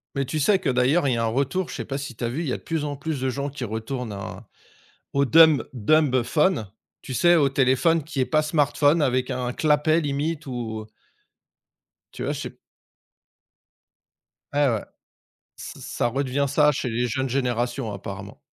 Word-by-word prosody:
Mais 140 Hz, 0 st, 0 dB
tu 155 Hz, +4 st, -3 dB
sais 190 Hz, +7 st, +3 dB
que, -, -, -1 dB
d'ailleurs, 130 Hz, +5 st, +2 dB
il 125 Hz, -, +2 dB
y -, -, -2 dB
a 115 Hz, -, 0 dB
un -, -, +1 dB
retour, 140 Hz, +10 st, -1 dB
je -, -, -6 dB
sais -, -, -5 dB
pas 135 Hz, -, -4 dB
si 135 Hz, -3 st, -6 dB
tu 120 Hz, -, -7 dB
as 115 Hz, -, 0 dB
vu, 135 Hz, +7 st, -3 dB
il 170 Hz, -, -3 dB
y -, -, -1 dB
a -, -, -2 dB
de -, -, -17 dB
plus 160 Hz, -2 st, -2 dB
en 145 Hz, -1 st, -3 dB
plus 145 Hz, +1 st, -4 dB
de 130 Hz, -, 0 dB
gens 140 Hz, +2 st, -3 dB
qui 140 Hz, -2 st, -7 dB
retournent 115 Hz, +1 st, -4 dB
au 95 Hz, -2 st, -7 dB, 0.7 s
au 140 Hz, 0 st, +3 dB
dumb 160 Hz, 0 st, +6 dB
dumbphone 135 Hz, -, +2 dB, 0.3 s
tu 130 Hz, -, -7 dB
sais, 175 Hz, +7 st, +5 dB
au 145 Hz, -4 st, +4 dB
téléphone 135 Hz, +5 st, +2 dB
qui 145 Hz, -2 st, -3 dB
est -, -, +2 dB
pas 155 Hz, +2 st, +2 dB
smartphone, 150 Hz, 0 st, +2 dB
avec 130 Hz, -2 st, +1 dB
un 125 Hz, -1 st, -2 dB
clapet 155 Hz, +2 st, +2 dB
limite, 150 Hz, +2 st, -2 dB
ou 115 Hz, -4 st, -5 dB, 1.3 s
Tu -, -, -9 dB
vois, -, -, -1 dB
je -, -, -4 dB
sais -, -, -6 dB, 2.0 s
Ouais, 145 Hz, 0 st, +2 dB
ouais, 110 Hz, -3 st, -2 dB, 0.7 s
ç -, -, -8 dB
ça -, -, -2 dB
redevient 135 Hz, +2 st, -1 dB
ça 150 Hz, +2 st, +4 dB
chez 130 Hz, -, -3 dB
les 120 Hz, +1 st, 0 dB
jeunes 130 Hz, +4 st, -1 dB
générations, 120 Hz, -2 st, -1 dB
apparemment. 100 Hz, 0 st, -8 dB
135 Hz, 195 wpm, -24 LUFS, 125-150 Hz, 2.0 s, dumb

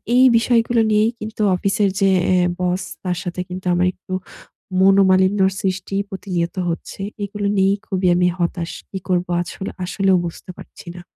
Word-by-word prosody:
এই 255 Hz, -, +6 dB
বিষয়গুলো 230 Hz, 0 st, +2 dB
নিয়েই 215 Hz, +2 st, +3 dB
কিন্তু 215 Hz, 0 st, -6 dB
অফিসের 195 Hz, +2 st, +1 dB
যে 195 Hz, -, +4 dB, 0.2 s
এ 185 Hz, -, +4 dB, 0.2 s
বস, 180 Hz, +1 st, 0 dB, 0.2 s
তার 180 Hz, -1 st, -1 dB
সাথে 180 Hz, 0 st, -4 dB
কিন্তু 185 Hz, +1 st, -7 dB
আমার 180 Hz, +1 st, +2 dB
একটু 185 Hz, 0 st, -10 dB, 0.7 s
মনোমালিন্যর 190 Hz, 0 st, +4 dB
সৃষ্টি 190 Hz, 0 st, -2 dB
প্রতিনিয়ত 180 Hz, -3 st, -3 dB
হচ্ছে। 170 Hz, +3 st, -5 dB, 0.2 s
এগুলো 205 Hz, 0 st, -3 dB
নিয়েই 195 Hz, +1 st, +3 dB
খুবই 185 Hz, -1 st, 0 dB
আমি 180 Hz, 0 st, +3 dB
হতাশ। 170 Hz, -1 st, -2 dB, 0.2 s
কি 195 Hz, -, -5 dB
করবো 180 Hz, -1 st, 0 dB
আছ 175 Hz, -, -6 dB, 0.3 s
আসলেও 190 Hz, +1 st, +2 dB
বুঝতে 170 Hz, +2 st, -7 dB
পারছি -, -, -13 dB
না। 175 Hz, -, -9 dB
190 Hz, 155 wpm, -20 LUFS, 180-200 Hz, 0.7 s, এই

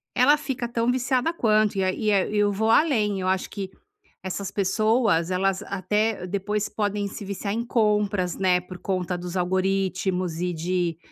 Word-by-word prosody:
ela 265 Hz, +4 st, +6 dB
fica 265 Hz, -4 st, -3 dB
tão 235 Hz, 0 st, 0 dB
viciada 260 Hz, +4 st, +1 dB
quanto. 215 Hz, -7 st, +2 dB
Ia 185 Hz, -1 st, +1 dB
Ia 210 Hz, -3 st, +1 dB
e 210 Hz, -, -2 dB
eu 205 Hz, 0 st, +3 dB
vou 220 Hz, +3 st, 0 dB
além, 215 Hz, -, +3 dB
acho 185 Hz, 0 st, 0 dB
que 195 Hz, -2 st, -5 dB, 0.5 s
essas 190 Hz, +1 st, -4 dB
pessoas, 205 Hz, -3 st, +2 dB
elas 195 Hz, +2 st, 0 dB
até 205 Hz, +1 st, -1 dB
depois 200 Hz, +2 st, -2 dB
podem 205 Hz, -1 st, -1 dB
se 200 Hz, +1 st, -8 dB
viciar 200 Hz, +1 st, -3 dB
em 235 Hz, +2 st, -2 dB
compras, 210 Hz, -6 st, +1 dB
né, 180 Hz, -2 st, +2 dB
por 180 Hz, 0 st, -10 dB
conta 180 Hz, -1 st, -2 dB
dos 180 Hz, +1 st, -6 dB
algoritmos 185 Hz, -1 st, 0 dB
e 180 Hz, 0 st, -1 dB
de 170 Hz, 0 st, -1 dB
200 Hz, 160 wpm, -25 LUFS, 185-215 Hz, 0.5 s, ela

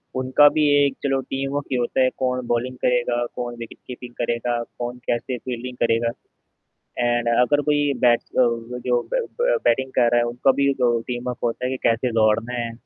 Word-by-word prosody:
उनका 130 Hz, +3 st, +5 dB
भी 155 Hz, -1 st, +3 dB, 0.2 s
एक 140 Hz, -, 0 dB
चलो 135 Hz, -1 st, +1 dB
टीम 135 Hz, +1 st, -4 dB
वर्क 145 Hz, -1 st, -2 dB
ही 130 Hz, -, +1 dB
होता 120 Hz, +2 st, 0 dB
है 130 Hz, -, +4 dB
कौन 125 Hz, -1 st, -1 dB
बॉलिंग 120 Hz, +2 st, -1 dB
करेगा, 120 Hz, -1 st, +1 dB
कौन 120 Hz, -1 st, -4 dB
विकेट 115 Hz, -, -9 dB
कीपिंग 125 Hz, -1 st, -9 dB
करेगा, 120 Hz, 0 st, -1 dB, 0.2 s
कौन 120 Hz, 0 st, -4 dB
कैसे 120 Hz, +1 st, -1 dB
फील्डिंग 125 Hz, +1 st, -6 dB
करेगा। 115 Hz, 0 st, +2 dB, 0.9 s
एंड 120 Hz, -1 st, +1 dB
अगर 125 Hz, +5 st, +3 dB
कोई 145 Hz, -1 st, +1 dB
बैट्स 120 Hz, -1 st, +3 dB
अ, -, -, +2 dB, 0.4 s
जो 125 Hz, -1 st, +2 dB
ब -, -, 0 dB, 0.2 s
ब -, -, +3 dB
बैटिंग 130 Hz, 0 st, +2 dB
कर 120 Hz, -2 st, +4 dB
रहा 120 Hz, -, +3 dB
है, -, -, +2 dB
उनका 120 Hz, +3 st, +2 dB
भी 140 Hz, 0 st, +3 dB
जो 120 Hz, -3 st, +1 dB
टीम-अप 125 Hz, 0 st, -4 dB
होता 120 Hz, +2 st, -1 dB
है 130 Hz, -, -1 dB
कि 130 Hz, -, -2 dB
कैसे 120 Hz, +2 st, +1 dB
दौड़ना 110 Hz, +2 st, +2 dB
है, 120 Hz, -1 st, -3 dB
125 Hz, 195 wpm, -22 LUFS, 120-130 Hz, 0.9 s, उनका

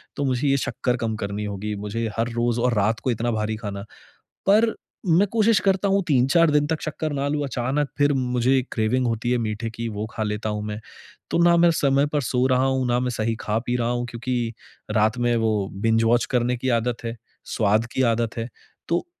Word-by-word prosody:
तो 145 Hz, -, -2 dB
मुझे 130 Hz, +1 st, 0 dB
ये 135 Hz, -, +3 dB
शक्कर 125 Hz, -1 st, -1 dB
कम 115 Hz, -2 st, -2 dB
करनी 105 Hz, 0 st, -4 dB
होगी। 105 Hz, +1 st, -4 dB
मुझे 105 Hz, +3 st, -3 dB
हर 115 Hz, +1 st, 0 dB
रोज़ 120 Hz, 0 st, 0 dB
और 125 Hz, 0 st, +2 dB
रात 105 Hz, +2 st, +1 dB
को 130 Hz, -, 0 dB
इतना 120 Hz, +1 st, -1 dB
भारी 110 Hz, 0 st, -1 dB
खाना 100 Hz, -2 st, -5 dB, 0.7 s
पर 220 Hz, +3 st, +5 dB, 0.3 s
मैं 180 Hz, +3 st, +4 dB
कोशिश 225 Hz, -1 st, +3 dB
करता 195 Hz, 0 st, +2 dB
हूँ 195 Hz, 0 st, +3 dB
3-4 145 Hz, +4 st, +4 dB
दिन 150 Hz, 0 st, +3 dB
तक 160 Hz, 0 st, -2 dB
शक्कर 155 Hz, +1 st, -3 dB
ना 140 Hz, 0 st, -1 dB
लूँ। 145 Hz, 0 st, -1 dB
अचानक 135 Hz, +3 st, -1 dB
फ़िर 145 Hz, 0 st, +3 dB
मुझे 130 Hz, 0 st, +2 dB
क्रेविंग 120 Hz, +3 st, +1 dB
होती 115 Hz, +1 st, -1 dB
है 125 Hz, -, +3 dB
मीठे 110 Hz, 0 st, -3 dB
की, 115 Hz, +1 st, -5 dB
वो 105 Hz, 0 st, -4 dB
खा 110 Hz, -, -3 dB
लेता 105 Hz, +1 st, -2 dB
हूँ 105 Hz, 0 st, -3 dB
मैं। 105 Hz, 0 st, -4 dB, 0.5 s
तो -, -, +2 dB
ना 170 Hz, 0 st, +6 dB
मैं 170 Hz, 0 st, +5 dB
समय 140 Hz, -2 st, +2 dB
पर 145 Hz, -, +2 dB
सो 125 Hz, +1 st, 0 dB
रहा 130 Hz, 0 st, +2 dB
हूँ, 130 Hz, -1 st, +1 dB
ना 120 Hz, 0 st, +2 dB
मैं 125 Hz, 0 st, -1 dB
सही 115 Hz, -1 st, -1 dB
खा-पी 115 Hz, +3 st, -1 dB
रहा 120 Hz, -1 st, 0 dB
हूँ 120 Hz, 0 st, -1 dB
क्योंकि 120 Hz, -1 st, -2 dB, 0.4 s
रात 110 Hz, +2 st, +2 dB
में 120 Hz, 0 st, +1 dB
वो 110 Hz, -3 st, 0 dB
बिंज-वॉच 115 Hz, +1 st, +3 dB
करने 125 Hz, 0 st, +1 dB
की 130 Hz, +2 st, -2 dB
आदत 120 Hz, 0 st, -3 dB
है, 115 Hz, +1 st, -3 dB, 0.3 s
स्वाद 110 Hz, +1 st, +1 dB
की 130 Hz, -, 0 dB
आदत 115 Hz, 0 st, -2 dB
है। 115 Hz, -, -2 dB, 0.4 s
तो 170 Hz, -, 0 dB
120 Hz, 210 wpm, -23 LUFS, 110-135 Hz, 0.7 s, ना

